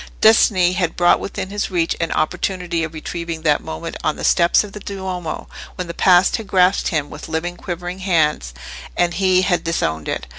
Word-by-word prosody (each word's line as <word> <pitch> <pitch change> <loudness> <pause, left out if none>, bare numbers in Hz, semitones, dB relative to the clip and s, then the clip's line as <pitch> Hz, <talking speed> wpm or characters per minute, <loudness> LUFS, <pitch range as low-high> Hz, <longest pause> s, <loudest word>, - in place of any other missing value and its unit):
Destiny 190 -5 +5
had 180 -3 -1
brought 175 0 +4
within 190 0 -5
his 205 0 -2
reach 170 -3 0
an 165 -1 -1
opportunity 175 0 -1
of 160 0 -5
retrieving 165 0 -5
that 150 -2 +2
moment 80 0 -6
on - - 0
the - - -8
steps 170 +3 +4
of 205 -2 -10
the 210 - -7
Duomo, 190 -4 -5 0.3
when 180 - -4
the 170 - -6
Past 180 +1 +4
had 225 -3 -8
grasped 185 0 +3
him 150 -5 -1
with - - -9
living 175 +2 -3
quivering 175 +1 -6
hands, 160 - +1 0.5
and 175 -1 +2
he 185 -1 +3
had 180 -2 +1
disowned 80 - -2
it. - - -3
175 Hz, 190 wpm, -20 LUFS, 165-185 Hz, 0.5 s, Destiny